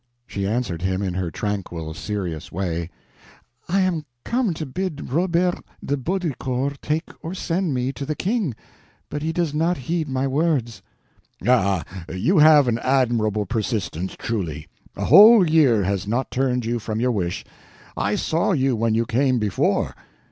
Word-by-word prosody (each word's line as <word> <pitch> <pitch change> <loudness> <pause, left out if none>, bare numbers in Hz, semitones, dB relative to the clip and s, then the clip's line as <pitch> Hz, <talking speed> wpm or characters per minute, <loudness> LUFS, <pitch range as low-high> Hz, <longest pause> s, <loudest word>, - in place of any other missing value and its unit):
She 100 -3 -3
answered 105 -6 -2
him 95 +1 -1
in 95 -2 -2
her 90 -1 -2
tranquil, 85 -5 -4
serious 90 -3 -4
way: 85 -2 -3 0.8
"I 195 +3 +2
am 180 -4 0 0.2
come 240 -4 +1
to 155 - -4
bid 155 0 -4
Robert 175 +2 +1 0.3
de 145 - 0
Baudricourt 140 -4 -2
take 155 +3 -2
or 170 +3 -5
send 175 -4 -1
me 125 +1 -1
to 140 - -6
the 155 +2 -3
King, 190 - -1 0.6
but 145 - -3
he 160 +2 -1
does 165 -3 -1
not 165 +3 +1
heed 160 +3 -2
my 130 0 0
words." 135 -4 0 0.7
"Ah, 100 -8 +3 0.3
you 155 - +2
have 150 -3 +7
an 115 -1 +1
admirable 115 -6 +1
persistence, 105 -4 -2
truly; 85 -10 -3 0.3
a - - -3
whole 205 - +8
year 140 -10 +4
has 95 +1 -1
not 120 +5 -1
turned 125 -2 0
you 120 +1 -1
from 110 0 -4
your 125 +2 +2
wish. 90 -6 -2 0.5
I 100 +1 0
saw 165 - +1
you 135 -5 +2
when 115 0 +1
you 115 +1 +1
came 130 +3 +2
before." 105 -5 0
125 Hz, 160 wpm, -22 LUFS, 105-160 Hz, 0.8 s, whole